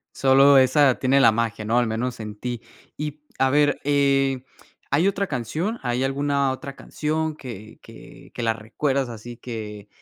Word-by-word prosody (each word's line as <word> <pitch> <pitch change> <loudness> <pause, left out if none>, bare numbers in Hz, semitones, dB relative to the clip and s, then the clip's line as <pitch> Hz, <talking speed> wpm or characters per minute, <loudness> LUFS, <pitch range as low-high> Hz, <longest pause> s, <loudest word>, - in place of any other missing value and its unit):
Solo 135 +1 +6
esa 130 0 +5
tiene 135 +1 +3
la 115 -4 +6
magia, 115 -1 -2
¿no? 115 +3 +1
Al 120 -1 +2
menos 120 +3 -3
en 105 -1 -6
ti. 120 +1 -5 0.4
Y, 150 0 -5 0.2
a 135 - +3
ver, 145 +1 +2
eh, 135 -2 +2 0.5
¿hay 155 +7 +2
otra 200 0 0
canción? 155 - -3
¿Hay 125 +1 -1
alguna 140 0 0
otra 135 +1 -7
canción? 155 +2 -3
que 115 -7 -10
que - - -15
que - - -5
la 115 -1 +2
recuerdas 130 +4 -2
así 120 +1 -9
que 105 -4 -7
130 Hz, 170 wpm, -23 LUFS, 115-145 Hz, 0.5 s, Solo